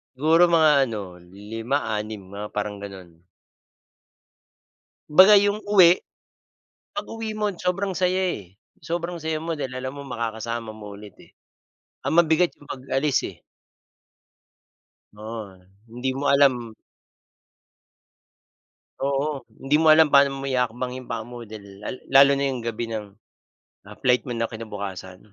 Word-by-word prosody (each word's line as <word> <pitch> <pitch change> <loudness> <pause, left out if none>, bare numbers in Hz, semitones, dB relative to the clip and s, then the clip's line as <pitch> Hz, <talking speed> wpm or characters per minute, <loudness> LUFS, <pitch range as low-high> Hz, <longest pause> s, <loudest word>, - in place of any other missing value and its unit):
Siguro 160 +5 +4
mga 155 -1 +6
ano 110 -4 -4 0.5
5 115 +5 -1 0.2
6 105 -1 -5
mga 105 +1 -5
parang 105 0 -3
gano'n. 95 -3 -9 2.0
'Baga 185 +7 +8
yung 205 +1 0
uwi, 185 -4 +5 0.9
pag-uwi 225 -7 -5
mo 210 -1 0
sobrang 185 +2 -2
saya, 185 0 +1
eh, 95 -1 -10 0.2
sobrang 170 +2 -4
saya 160 0 -2
mo 170 - -2
dahil 135 -5 -4
alam 130 +1 -4
mo 140 0 -9
makakasama 115 -1 -4
mo 105 -2 -10
ulit, 105 -1 -12
eh, - - -18 0.8
ang - - 0
mabigat 170 +1 +3
yung 145 - -19
pag-alis, 135 +2 0
eh. - - -12 1.7
Oo, 110 -2 -8 0.3
hindi 125 +3 -4
mo 135 +2 -2
alam 130 -5 +3 2.2
Oo, 140 +1 -1 0.2
hindi 140 +2 +2
mo 155 0 +6
alam 155 -1 +5
pa'no 140 -1 +5
maihahakbang 125 -1 -2
yung 130 - -11
paa 115 -1 -2
mo 120 +1 -9
dahil 100 -2 -11
lal - - -4
lalo 140 +1 +7
na 140 0 0
yung 125 -3 -5
gabi 115 0 -3
ng, 110 -2 -4 0.8
ah, - - -12
flight 125 0 +2
mo 125 - -4
na 115 - 0
kinabukasan. 100 -5 -7
130 Hz, 135 wpm, -24 LUFS, 110-160 Hz, 2.2 s, Baga